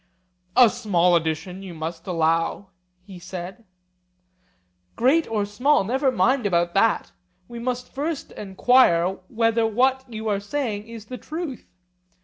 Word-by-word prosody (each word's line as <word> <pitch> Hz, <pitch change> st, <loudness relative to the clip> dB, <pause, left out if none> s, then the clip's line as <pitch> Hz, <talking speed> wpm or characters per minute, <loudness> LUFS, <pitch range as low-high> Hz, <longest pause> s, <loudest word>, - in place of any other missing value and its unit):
A 250 Hz, -, +8 dB
small 180 Hz, -7 st, +2 dB
addition, 170 Hz, +3 st, -2 dB
you 185 Hz, -3 st, -9 dB
must 165 Hz, +2 st, -6 dB
allow, 165 Hz, +2 st, 0 dB, 0.3 s
he 190 Hz, -2 st, -11 dB
said. 185 Hz, +5 st, -8 dB, 1.3 s
Great 285 Hz, +7 st, +3 dB
or 215 Hz, -2 st, 0 dB
small, 250 Hz, +7 st, +2 dB
never 265 Hz, +6 st, +1 dB
mind 245 Hz, +2 st, +2 dB
about 175 Hz, -2 st, +1 dB
that: 215 Hz, +2 st, +2 dB, 0.4 s
we 235 Hz, 0 st, -8 dB
must 250 Hz, +1 st, -4 dB
first 295 Hz, +2 st, -4 dB
enquire 190 Hz, -3 st, +3 dB
whether 230 Hz, 0 st, +1 dB
what 260 Hz, +4 st, +2 dB
you 220 Hz, 0 st, -5 dB
are 205 Hz, -2 st, +1 dB
saying 210 Hz, -1 st, -3 dB
is 230 Hz, -2 st, -10 dB
the 250 Hz, +3 st, -8 dB
truth. 310 Hz, -5 st, -6 dB
215 Hz, 130 wpm, -23 LUFS, 185-250 Hz, 1.3 s, A